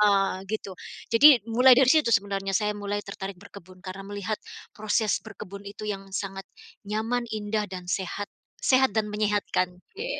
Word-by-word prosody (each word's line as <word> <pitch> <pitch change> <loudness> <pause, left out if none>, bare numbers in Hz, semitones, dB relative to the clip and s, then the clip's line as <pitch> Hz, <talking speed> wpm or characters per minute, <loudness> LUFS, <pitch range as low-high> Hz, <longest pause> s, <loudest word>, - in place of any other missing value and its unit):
ah, 195 -1 +3 0.2
gitu. 210 -1 -4 0.4
Jadi 230 +6 +8 0.2
mulai 250 +3 +7
dari 260 +1 +5
situ 310 -7 +4
sebenarnya 195 -1 0
saya 210 +1 +2
mulai 205 0 -2
tertarik 195 -1 -6
berkebun 185 -2 -14
karena 190 +1 -7
melihat 205 +1 -3 0.4
proses 215 -1 +1
berkebun 200 +2 -10
itu 200 +1 -9
yang 195 -1 -4
sangat 195 -1 -4 0.4
nyaman, 225 +4 -1
indah, 210 0 -2
dan 185 -2 -7
sehat. 200 +2 -3 0.3
Sehat 260 -1 +4
dan 220 -1 +1
menyehatkan, 210 -3 0
oke. 430 - -9
205 Hz, 155 wpm, -26 LUFS, 195-220 Hz, 0.4 s, Jadi